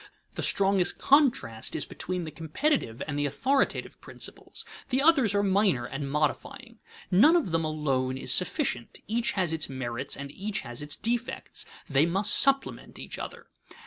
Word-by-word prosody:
The - - -4
strongest 195 -2 +3
contrast 245 - +2
is 150 - 0
between 180 -1 -4
the 155 - -6
competitive 165 - -1
and 145 -1 -3
the 145 - +1
authoritative 270 - 0
principles; - - -6 0.2
the 260 0 +1
others 275 - +4
are 200 - +2
minor 195 - +2
and 135 +2 -5
modifying. 230 - -2 0.3
None 240 - +6
of 320 - +1
them 165 0 +1
alone 135 -4 -1
is - - +2
sufficient; 180 - -1
each 230 +2 0
has 180 -5 +1
its 160 -2 -1
merits 130 -2 -3
and 140 0 -7
each 205 +5 -4
has 120 +2 -6
its 150 0 -3
defects; 235 +1 -3 0.2
they 140 +3 +3
must 195 +4 +2
supplement 275 0 +1
each - - -7
other. - - -7
180 Hz, 160 wpm, -28 LUFS, 145-240 Hz, 0.3 s, None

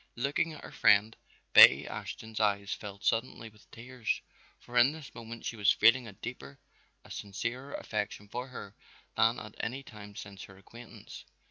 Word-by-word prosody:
Looking 140 +6 0
at 150 - -11
her - - -9
friend, 105 +2 +4 0.4
Betty - - +9
Ashton's 110 -1 -7
eyes 100 -1 +1
filled 100 -1 -9
suddenly 115 -1 -1
with 105 -1 -23
tears, 120 -1 -4 0.4
for 120 - -13
in 125 +4 +5
this 155 -4 -11
moment 115 0 -9
she - - -3
was 105 -2 +4
feeling 115 +2 +4
a - - -8
deeper, 125 +6 -8 0.5
a - - -14
sincerer 115 +7 -5
affection 105 -1 -4
for 125 +5 -5
her 110 -6 -9 0.4
than 115 +2 +3
at 105 0 -10
any 130 +4 -3
time 105 -5 -12
since 100 -1 -9
their 95 - -15
acquaintance. 115 +5 -12
115 Hz, 165 wpm, -31 LUFS, 105-125 Hz, 0.5 s, Betty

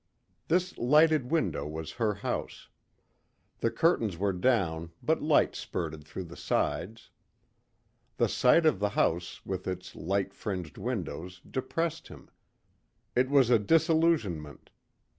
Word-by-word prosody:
This 180 +2 +1
lighted 150 +1 +4
window 155 - 0
was 80 +1 -6
her 110 -3 -1
house. 100 - -4 0.9
The 115 - +1
curtains 115 - +1
were 100 +2 0
down 90 -6 +1
but 160 +1 +1
light 150 0 +3
spurted 80 -3 -5
through 80 +4 -6
the 85 0 -11
sides. 110 +5 -2 1.1
The - - +3
sight 160 +6 +4
of 155 -11 +3
the 105 0 +1
house 85 +1 0
with 95 -1 -4
its 90 0 -5
light 95 +4 -1
fringed 90 -6 -5
windows 90 - -4
depressed 165 +5 -3
him. 70 -3 -14 0.8
It 130 +1 +3
was 135 -4 +4
a 115 - +6
disillusionment. 160 - +1
105 Hz, 125 wpm, -29 LUFS, -, 1.1 s, a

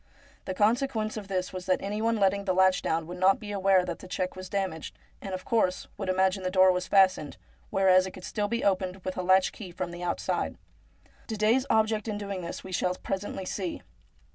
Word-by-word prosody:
The 185 - -4
consequence 220 +1 +1
of 210 -3 -6
this 185 -2 -2
was 185 0 -6
that 185 - +2
any 205 +2 -3
one 230 +1 +2
letting 200 0 +2
the 185 -2 +1
latch 190 0 +4
down 160 0 -1
would 175 +2 -8
not 190 +1 +4
be 210 -2 -7
aware 195 -2 +3
that 175 -2 -5
the - - -11
check 185 0 -3
was 185 0 -8
damaged, 190 -5 -3 0.2
and, 195 - -6
of 185 - -8
course, 200 -6 +1
would 195 -2 -4
imagine 190 +1 +2
the 185 - -1
door 185 0 +5
was 180 0 -2
fastened, 190 -6 +3 0.3
whereas 190 -1 +4
it - - -7
could 185 - -11
still 210 +1 -2
be 235 +2 -2
opened 190 -1 0
with 185 - -3
a - - -2
latch 185 +1 +4
key 200 -5 -9
from 180 0 -4
the 175 0 -8
outside. 175 -1 -2 0.7
Didet's 225 +4 +2
object 220 -1 +2
in 210 -2 -2
doing 200 -2 -4
this 170 - -6
we 190 - -9
shall 180 0 0
pre 195 - -3
sently 190 -1 -6
see. 185 -3 -4
190 Hz, 220 wpm, -28 LUFS, 185-205 Hz, 0.7 s, door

